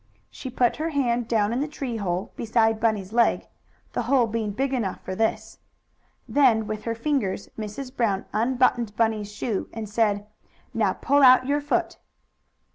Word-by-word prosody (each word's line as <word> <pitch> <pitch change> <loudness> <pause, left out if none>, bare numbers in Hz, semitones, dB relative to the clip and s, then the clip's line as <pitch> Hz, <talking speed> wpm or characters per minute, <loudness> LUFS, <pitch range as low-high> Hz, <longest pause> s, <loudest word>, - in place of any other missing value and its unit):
She 260 - -7
put 245 -1 +1
her 320 +2 -2
hand 245 -6 0
down 220 -2 +1
in 245 - -1
the 295 - -1
tree 275 -6 -4
hole, 185 -2 -2
beside 225 -1 +1
Bunny's 215 -3 0
leg, 235 0 +2 0.5
the - - -1
hole 265 -4 +4
being 225 -1 -2
big 270 +7 -2
enough 220 -8 -2
for 185 - -5
this. 220 +2 -2 0.7
Then, 245 -6 +3
with 215 0 -5
her 230 -1 -1
fingers, 230 -7 -1
Mrs. 240 +5 -6
Brown 205 -6 0
unbuttoned 240 -1 +1
Bunny's 220 -2 0
shoe, 210 0 -3
and 225 -1 -6
said: 205 -1 0 0.5
"Now - - +1
pull 285 +1 +2
out 255 -1 +7
your 290 +2 0
foot." 290 - -1
230 Hz, 165 wpm, -25 LUFS, 215-255 Hz, 0.7 s, out